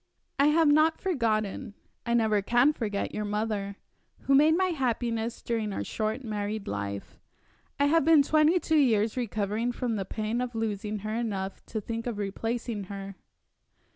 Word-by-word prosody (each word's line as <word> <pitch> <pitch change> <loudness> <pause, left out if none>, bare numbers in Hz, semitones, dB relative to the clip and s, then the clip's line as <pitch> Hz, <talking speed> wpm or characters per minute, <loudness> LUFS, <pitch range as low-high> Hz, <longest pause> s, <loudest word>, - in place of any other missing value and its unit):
I 280 - +5
have 315 +1 +4
not 310 +2 +4
forgotten 215 - -1 0.3
I 235 - +2
never 220 -3 +3
can 245 +8 +3
forget 210 -7 -3
your 210 - -2
mother, 205 -1 -2 0.5
who 275 - +1
made 305 +4 +5
my 375 0 +2
happiness 235 -6 -2
during 225 -3 -1
our - - -3
short 220 +4 -3
married 210 -1 -3
life. 100 0 -5 0.6
I 285 - +4
have 325 +2 +4
been 315 -1 +6
twenty 315 +2 +3
years 220 -4 +2
recovering 220 -1 -1
from 240 -2 -2
the 195 - -3
pain 215 +4 -2
of 250 -1 -4
losing 215 -1 -2
her 215 - -2
enough 200 -5 -3
to 220 - -3
think 230 +3 -5
of 235 -4 -3
replacing 220 +1 -3
her." 195 0 -7
225 Hz, 160 wpm, -28 LUFS, 210-265 Hz, 0.6 s, been